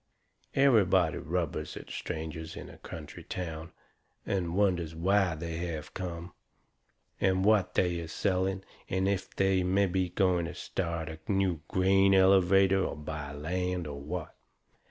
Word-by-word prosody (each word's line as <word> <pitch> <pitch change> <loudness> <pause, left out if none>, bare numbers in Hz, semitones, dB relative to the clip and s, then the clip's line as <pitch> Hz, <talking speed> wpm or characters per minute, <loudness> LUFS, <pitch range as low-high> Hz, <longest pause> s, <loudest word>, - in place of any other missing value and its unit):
Everybody 100 - +4
rubbers 85 -1 -3
at - - -9
strangers 80 0 -5
in - - -8
a - - -15
country - - -9
town, 80 -2 -5 0.5
and 90 -3 -1
wonders 90 -5 +1
why 95 0 +2
they 80 +1 -5
have 85 -3 -5
come, 90 -1 -5 0.9
and 95 0 +2
what 100 -4 +3
they 90 -2 +2
is 80 -1 -6
selling, 95 +1 0 0.3
and 95 +1 +1
if 100 -1 -2
they 95 -1 +3
are - - -1
mebby 95 -1 +2
going 90 -2 +2
to - - -6
start 85 -3 -3
a 80 0 -7
new 95 -5 +1
grain 95 +1 +4
elevator, 95 0 +5
or - - -2
buy 75 -1 -6
land, 90 +4 -2
or 70 -1 -6
what. 80 +3 -5
90 Hz, 145 wpm, -30 LUFS, 80-95 Hz, 0.9 s, elevator